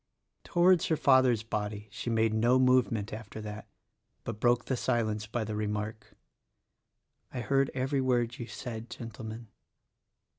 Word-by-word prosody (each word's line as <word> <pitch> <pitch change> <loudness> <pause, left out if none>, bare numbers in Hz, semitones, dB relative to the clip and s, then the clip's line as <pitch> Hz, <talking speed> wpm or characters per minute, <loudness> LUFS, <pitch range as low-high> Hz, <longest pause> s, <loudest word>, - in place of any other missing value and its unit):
Towards 175 -1 +4
her 160 - +1
father's 130 -6 +4
body 105 -1 -4
she 120 +1 -4
made 115 -1 +2
no 120 +3 +4
movement 125 -5 +2
after 110 0 -7
that, 105 0 -7 0.6
but 110 -2 -5
broke 120 +1 +3
the 130 - 0
silence 110 -3 -1
by 115 +1 -2
the 110 0 -4
remark, 105 +1 -3 1.2
"I 125 - -4
heard 135 +4 +2
every 135 +1 0
word 120 -3 +2
that 120 - -12
you 120 - -5
said, 110 +1 -7
Gentlemen." 115 -1 -8
115 Hz, 145 wpm, -30 LUFS, 110-125 Hz, 1.2 s, Towards